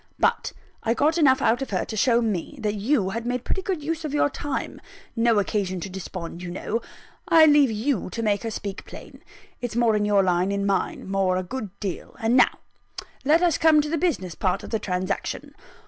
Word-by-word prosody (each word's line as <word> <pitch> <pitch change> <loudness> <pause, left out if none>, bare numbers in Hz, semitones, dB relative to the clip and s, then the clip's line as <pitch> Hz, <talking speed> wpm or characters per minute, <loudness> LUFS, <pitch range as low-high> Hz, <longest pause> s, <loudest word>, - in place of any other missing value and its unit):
But - - +1 0.3
I 230 +1 0
got 315 +5 +2
enough 265 -4 +4
out 240 +4 +2
of 270 - -3
her 185 -3 -1
to 220 - -6
show 235 +2 +3
me 220 - -3
that 210 -1 0
you 210 -1 0
had 230 +3 -3
made 245 +1 -2
pretty 380 - -1
good 365 -5 -3
use 325 +2 -3
of 300 -2 -3
your 290 - +2
time 290 -1 -4 0.3
no 230 -1 +3
occasion 195 -2 -1
to 190 - -6
despond, 180 -2 -7
you 180 - -6
know 210 +6 -3 0.5
I 325 -2 +7
leave 295 -3 +5
you 220 0 -1
to 230 +4 -4
make 205 -2 +1
her 230 - -3
speak 205 -2 -5
plain; - - -12 0.4
it's 245 -3 -4
more 235 -2 +3
in 210 0 +1
your 205 -1 +3
line 180 0 +1
than 200 0 -1
mine, 195 -1 -1
more 190 -1 +1
a 185 - -1
good 220 +2 -5
deal. 195 -4 -5
And 225 +2 +1
now 250 - +4 0.7
let 315 +5 +4
us 340 -4 +2
come 315 -2 +5
to 300 0 0
the 330 - 0
business 245 - -1
part 180 +3 -1
of - - -9
the 220 - 0
transaction. 185 0 -3
225 Hz, 215 wpm, -24 LUFS, 195-285 Hz, 0.7 s, I